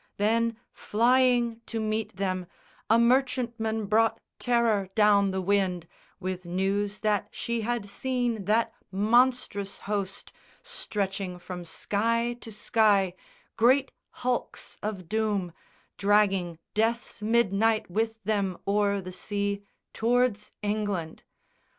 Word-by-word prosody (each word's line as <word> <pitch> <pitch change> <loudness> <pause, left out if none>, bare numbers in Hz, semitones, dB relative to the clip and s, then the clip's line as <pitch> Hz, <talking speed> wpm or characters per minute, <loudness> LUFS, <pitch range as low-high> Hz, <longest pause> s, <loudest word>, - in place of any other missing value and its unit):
Then, 230 +2 +1 0.2
flying 240 0 +2
to 225 - -3
meet 215 0 -2
them, 185 -2 -2 0.4
A 225 - +6
merchantman 235 -3 +1
brought 220 +3 +2 0.2
terror 230 -5 +2
down 205 -2 +5
the 190 0 -2
wind, 185 -3 +1 0.3
With 185 -1 -4
news 195 +3 -1
that 210 -2 +1
she 235 -1 -3
had 235 -1 -1
seen 240 -1 -1
that 220 +3 +2 0.2
monstrous 215 -1 +2
host 200 -2 -4 0.3
Stretching 195 - -3
from 180 0 -7
sky 230 +7 0
to 225 - -9
sky, 205 -3 +2 0.4
great 260 +4 +4 0.3
hulks 250 -1 -2
of 200 -5 -4
doom, 205 -4 -1 0.5
Dragging 195 -4 +2 0.2
death's 225 +1 -1
midnight 220 0 +2
with 225 +2 -1
them 195 -3 0
o'er 200 0 +2
the 185 0 -7
sea 200 +1 -2 0.3
Tow'rds 235 -2 +1
England. 205 -6 -2
210 Hz, 110 wpm, -27 LUFS, 195-230 Hz, 0.5 s, A